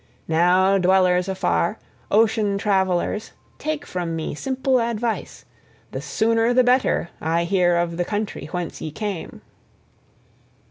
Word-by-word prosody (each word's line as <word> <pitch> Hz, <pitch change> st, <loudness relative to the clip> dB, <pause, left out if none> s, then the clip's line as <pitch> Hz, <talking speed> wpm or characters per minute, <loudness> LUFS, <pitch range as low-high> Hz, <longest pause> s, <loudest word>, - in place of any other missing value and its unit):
Now, 180 Hz, +4 st, +3 dB
dwellers 180 Hz, 0 st, +3 dB
afar, 85 Hz, -, 0 dB, 0.3 s
ocean 215 Hz, -2 st, +2 dB
travellers, 195 Hz, +1 st, 0 dB, 0.3 s
take 305 Hz, -1 st, -3 dB
from 175 Hz, -2 st, -3 dB
me 160 Hz, -, -3 dB
simple 260 Hz, -, 0 dB
advice: 230 Hz, -2 st, -3 dB, 0.5 s
the 130 Hz, -, -5 dB
sooner 225 Hz, -, +1 dB
the 255 Hz, -, +6 dB
better 250 Hz, -7 st, +2 dB
I 165 Hz, +2 st, +1 dB
hear 175 Hz, -1 st, +2 dB
of 170 Hz, -1 st, -1 dB
the 175 Hz, -, +1 dB
country 210 Hz, +3 st, -4 dB
whence 180 Hz, -2 st, -4 dB
ye 155 Hz, -, -4 dB
came." 195 Hz, +1 st, -6 dB
190 Hz, 125 wpm, -22 LUFS, 175-225 Hz, 0.5 s, the